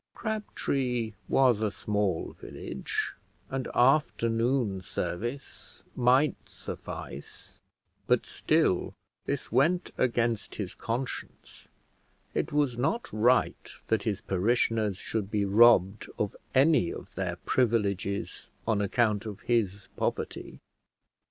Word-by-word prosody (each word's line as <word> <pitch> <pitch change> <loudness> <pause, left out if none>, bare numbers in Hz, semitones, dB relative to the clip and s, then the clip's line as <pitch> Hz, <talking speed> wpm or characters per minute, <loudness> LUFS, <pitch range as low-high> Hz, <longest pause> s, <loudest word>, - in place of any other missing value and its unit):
Crabtree 135 - -2 0.2
was 125 -5 +4
a 110 - +2
small 105 -4 -1
village, - - -4 0.4
and 135 -1 -2
afternoon 120 -5 +2
service 105 +10 -5
might 130 +4 +2
suffice, - - -8 0.5
but - - +3
still - - +1 0.3
this - - -3
went 165 +9 +2
against 120 -3 0
his 100 -4 -4
conscience; 125 +3 -5 0.7
it - - -1
was 145 -5 +1
not 160 - -1
right 120 +4 +2 0.2
that 110 - +2
his 105 -4 -2
parishioners 110 +1 +1
should 105 -1 -3
be 105 -1 +1
robbed 100 -1 +5
of 105 - -1 0.2
any 135 - +4
of - - -9
their 90 -2 -2
privileges 100 -3 0 0.2
on 110 -3 +2
account 105 0 +1
of 105 -1 -7
his 100 -5 0
poverty. - - -3
115 Hz, 105 wpm, -29 LUFS, 100-130 Hz, 0.7 s, robbed